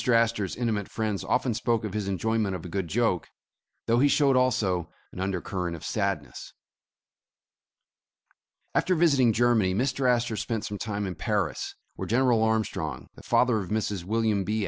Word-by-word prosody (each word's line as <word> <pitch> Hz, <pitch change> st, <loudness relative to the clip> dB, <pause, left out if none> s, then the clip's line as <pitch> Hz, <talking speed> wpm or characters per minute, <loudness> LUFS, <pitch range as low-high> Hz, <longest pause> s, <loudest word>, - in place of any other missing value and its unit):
Astor 115 Hz, -4 st, +2 dB
's -, -, -6 dB
intimate 110 Hz, -5 st, -1 dB
friends 110 Hz, -3 st, -2 dB
often 125 Hz, -1 st, +1 dB
spoke 115 Hz, 0 st, 0 dB
of 105 Hz, -3 st, -4 dB
his 105 Hz, -2 st, -2 dB
enjoyment 100 Hz, +1 st, 0 dB
of 90 Hz, -, -7 dB
a -, -, -6 dB
good 95 Hz, 0 st, -2 dB
joke, 105 Hz, -2 st, 0 dB, 0.6 s
though 115 Hz, +1 st, +3 dB
he 145 Hz, -, +5 dB
showed 140 Hz, -1 st, +3 dB
also 100 Hz, -10 st, +1 dB, 0.2 s
an -, -, -9 dB
undercurrent 90 Hz, -2 st, -2 dB
of 80 Hz, -, -9 dB
sadness. 100 Hz, -, -3 dB, 2.2 s
After 185 Hz, -, +2 dB
visiting 140 Hz, -8 st, +4 dB
Germany, 110 Hz, -5 st, +2 dB
Mr. 130 Hz, +3 st, +1 dB
Astor 120 Hz, -2 st, +1 dB
spent 110 Hz, +2 st, -2 dB
some 105 Hz, -1 st, -5 dB
time 105 Hz, -1 st, -3 dB
in 95 Hz, -, -3 dB
Paris, 80 Hz, -, -2 dB, 0.2 s
where -, -, -4 dB
General 120 Hz, -1 st, +3 dB
Armstrong, 110 Hz, -1 st, -1 dB
the -, -, -14 dB
father 125 Hz, -3 st, +2 dB
of 95 Hz, -3 st, -5 dB
Mrs 105 Hz, -4 st, -1 dB
William 110 Hz, 0 st, +1 dB
B. 110 Hz, +3 st, -1 dB
110 Hz, 165 wpm, -27 LUFS, 95-120 Hz, 2.2 s, he